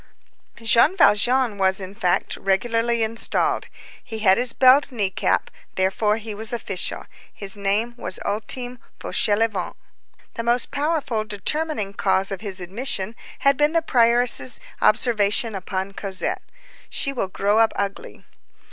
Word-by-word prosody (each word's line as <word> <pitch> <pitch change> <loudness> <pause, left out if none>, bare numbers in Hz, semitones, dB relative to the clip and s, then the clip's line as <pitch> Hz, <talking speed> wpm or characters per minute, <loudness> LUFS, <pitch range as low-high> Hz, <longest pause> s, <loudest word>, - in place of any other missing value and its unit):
Jean 235 - +4
Valjean 240 - +3
was, 190 0 +2
in 190 0 -7
fact, 180 -4 0
regularly 230 +4 0
installed; 225 +1 -1 0.4
he 225 - -7
had 195 -3 +4
his 245 +2 +2
belled 265 +3 +5
knee 205 -6 -1
cap; - - 0 0.3
henceforth 210 +3 +1
he 220 -1 -6
was 220 +2 -4
official. 210 -6 -3 0.3
His 195 -1 -5
name 205 +4 0
was 210 - -2
Ultime 245 +4 -3 0.2
Fauchelevent. 205 -3 0 0.6
The - - -4
most 240 +1 +1
powerful 285 -7 -1
determining 215 +1 -2
cause 190 -1 +1
of 195 - -5
his 200 -3 -5
admission 200 +2 -3 0.3
had 275 -1 +4
been 295 +1 +2
the 330 -1 +2
prioress's 240 -1 +4 0.2
observation 220 0 +2
upon 190 0 -4
Cosette: 195 -1 -3 0.5
"She 275 - -1
will 240 -7 -2
grow 205 +3 +1
up 225 -1 +4
ugly." 200 0 -5
220 Hz, 135 wpm, -22 LUFS, 195-245 Hz, 0.6 s, belled